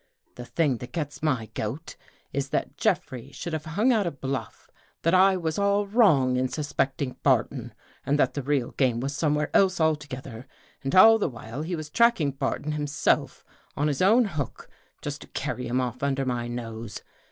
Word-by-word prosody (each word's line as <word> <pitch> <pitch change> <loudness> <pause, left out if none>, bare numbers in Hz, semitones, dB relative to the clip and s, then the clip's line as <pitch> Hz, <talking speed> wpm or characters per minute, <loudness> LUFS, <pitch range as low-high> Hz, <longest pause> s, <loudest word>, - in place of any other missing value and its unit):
The 120 - -9
thing 145 -3 +1
that 125 - -9
gets 150 -4 -4
my 130 -8 0
goat 130 +10 -5 0.4
Is 140 0 -2
that - - -2
Jeffrey 130 -1 -1
should 170 - -6
have 155 0 -3
hung 210 +11 +2
out 210 -5 +1
a - - -1
bluff 135 -5 -5 0.4
that 165 - +2
I 190 +1 +5
was 160 0 -2
all 200 0 +2
wrong 160 - +4
in 130 0 +1
suspecting 135 -1 -2
Barton - - +1 0.3
and 145 - +1
that - - +2
the 145 - -3
real 135 -2 0
game 125 -4 +1
was 135 +3 -3
somewhere 150 +1 0
else 190 -2 +4
altogether, 140 -6 -2 0.4
and 135 - -1
all 225 +4 +8
the 200 - 0
while 115 +2 -7
he 170 +3 -3
was 155 -2 -7
tracking 235 -11 +3
Barton 140 +2 -2
himself 150 -1 0 0.3
on 145 - +1
his 145 -3 -1
own 225 +6 +5
hook, 155 - -5 0.4
just - - -5
to - - -11
carry 125 - -4
him 125 +2 0
off 125 -1 -3
under 135 -1 0
my 120 -2 -2
nose. 115 -2 -6
145 Hz, 185 wpm, -26 LUFS, 130-165 Hz, 0.4 s, all